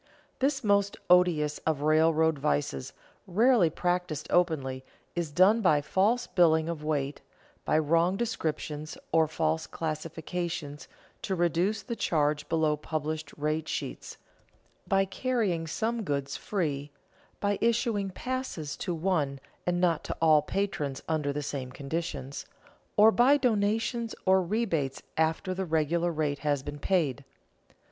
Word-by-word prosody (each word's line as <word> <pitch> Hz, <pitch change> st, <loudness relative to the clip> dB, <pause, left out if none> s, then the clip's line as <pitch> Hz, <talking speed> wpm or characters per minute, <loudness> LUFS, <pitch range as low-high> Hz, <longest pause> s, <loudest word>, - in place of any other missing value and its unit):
_ -, -, -38 dB, 0.4 s
This 270 Hz, 0 st, +1 dB
most 200 Hz, -1 st, +2 dB
odious 165 Hz, -5 st, +4 dB
of 155 Hz, -3 st, -1 dB
railroad 160 Hz, 0 st, +3 dB
vices, 140 Hz, -, -1 dB, 0.4 s
rarely 215 Hz, -1 st, +4 dB
practised 175 Hz, -2 st, -1 dB
openly, 140 Hz, -7 st, +1 dB, 0.3 s
is 170 Hz, -3 st, -1 dB
done 190 Hz, +8 st, +5 dB
by 165 Hz, -7 st, +4 dB
false 200 Hz, +11 st, +1 dB
billing 160 Hz, -3 st, +3 dB
of 165 Hz, -3 st, -4 dB
weight, 145 Hz, -2 st, -2 dB, 0.4 s
by -, -, +2 dB
wrong 165 Hz, +4 st, +2 dB
descriptions 155 Hz, -8 st, -3 dB
or 160 Hz, -1 st, +4 dB
false 160 Hz, +1 st, -1 dB
classification 165 Hz, 0 st, -4 dB, 0.4 s
to 190 Hz, -, -2 dB
reduce 175 Hz, +4 st, +1 dB
the 235 Hz, -, -4 dB
charge 150 Hz, -6 st, 0 dB
below 160 Hz, -2 st, +2 dB
published 155 Hz, 0 st, -4 dB
rate 155 Hz, +1 st, -1 dB
sheets, -, -, -5 dB, 0.7 s
by 195 Hz, -1 st, +3 dB
carrying 195 Hz, -6 st, -1 dB
some 225 Hz, +8 st, -1 dB
goods 140 Hz, -7 st, -2 dB
free, 150 Hz, -8 st, -2 dB, 0.5 s
by 205 Hz, -1 st, 0 dB
issuing 230 Hz, -3 st, +1 dB
passes 190 Hz, -, -4 dB
to 175 Hz, -, -3 dB
one 155 Hz, -6 st, 0 dB, 0.3 s
and 175 Hz, 0 st, +1 dB
not 175 Hz, -3 st, +2 dB
to -, -, -4 dB
all 155 Hz, -2 st, +5 dB
patrons 150 Hz, -6 st, -2 dB
under 155 Hz, -3 st, 0 dB
the 145 Hz, +1 st, -3 dB
same 135 Hz, -3 st, -4 dB
conditions, 140 Hz, -1 st, -5 dB, 0.5 s
or 215 Hz, +2 st, +8 dB
by 255 Hz, +5 st, +5 dB
donations 225 Hz, -1 st, 0 dB
or 190 Hz, 0 st, +5 dB
rebates 170 Hz, -, -1 dB
after 160 Hz, +4 st, 0 dB
the 190 Hz, +1 st, -3 dB
regular 165 Hz, +2 st, +1 dB
rate 150 Hz, -3 st, -1 dB
has 145 Hz, -3 st, 0 dB
been 145 Hz, +1 st, -6 dB
paid. 145 Hz, -6 st, 0 dB
165 Hz, 135 wpm, -29 LUFS, 150-195 Hz, 0.7 s, or